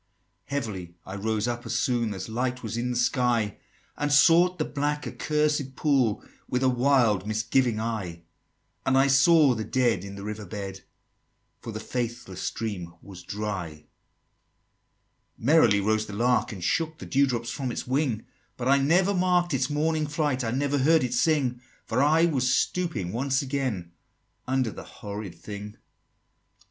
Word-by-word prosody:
"Heavily 100 -11 -4
I 95 - -7
rose 110 +2 -1
up, 120 0 -3
as - - -2
soon 115 -4 0
As 95 - -6
light 125 +2 -2
was 110 0 -4
in 120 +1 -1
the 125 - -2
sky, 120 -4 +1 0.4
And 145 0 -1
sought 170 +5 +5
the 155 - -1
black 145 +1 -2
accursed 150 -3 -1
pool 130 -7 +1 0.2
With 125 +1 0
a 130 - +4
wild 120 -6 +2
misgiving 110 +2 +1
eye; 100 -7 -4 0.6
And 130 0 +2
I 135 - +5
saw 140 +1 +5
the 110 -2 -3
Dead 120 -6 +1
in 100 0 -8
the 100 - -8
river 105 -1 -6
bed, 95 0 -6 0.8
For 115 - -7
the 110 - -5
faithless 120 -5 -4
stream 90 -7 -4
was 95 -3 -11
dry." 100 -4 -4
XXIX. 75 -1 -15 1.6
"Merrily 120 -8 +5
rose 110 +1 +1
the 105 - -8
lark, 120 +4 +1
and 95 -5 -7
shook 160 - 0
The - - -9
dew 140 +1 +3
drop 120 -3 -2
from 130 +1 -3
its - - -4
wing; 130 -4 0 0.3
But 125 - -3
I 140 0 +5
never 180 +8 +3
mark'd 180 -2 +2
its 130 0 +1
morning 155 +1 0
flight, 145 -3 -1
I 115 - -1
never 140 +3 0
heard 160 +3 +4
it 125 - -2
sing: 135 -6 +1 0.2
For 115 +3 0
I 155 +4 +4
was 130 -6 +2
stooping 140 - -1
once 135 +3 0
again 130 -11 -3 0.6
Under 130 -3 +1
the - - -9
horrid 100 -3 -8
thing." 105 +4 -8
XXX. - - -27
125 Hz, 165 wpm, -26 LUFS, 105-145 Hz, 1.6 s, sought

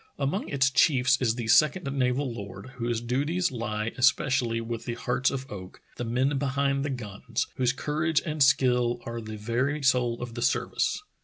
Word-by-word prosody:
Among 150 +10 -2
its 135 -1 +2
chiefs 130 -1 +3
is 115 -3 +2
the 120 -2 -4
second 155 +9 +4
naval 130 0 0
lord, 100 +3 -8
whose 120 -1 -1
duties 145 +9 0
lie 115 -2 -3
especially 130 -3 +2
with 115 0 -5
the 120 - -3
hearts 125 +2 0
of 135 -1 -4
oak, 95 -2 -9 0.2
the - - -3
men 130 +4 0
be 140 - -1
hind 140 0 0
the 145 - -2
guns, 115 -7 -3
whose 125 -1 +2
courage 150 +4 0
and 155 -2 -3
skill 125 -3 +3
are 115 0 -5
the 110 -1 -7
very 130 +7 -1
soul 125 -3 +2
of 120 -1 -6
the 120 - -5
service. 120 - 0
125 Hz, 180 wpm, -27 LUFS, 115-140 Hz, 0.2 s, second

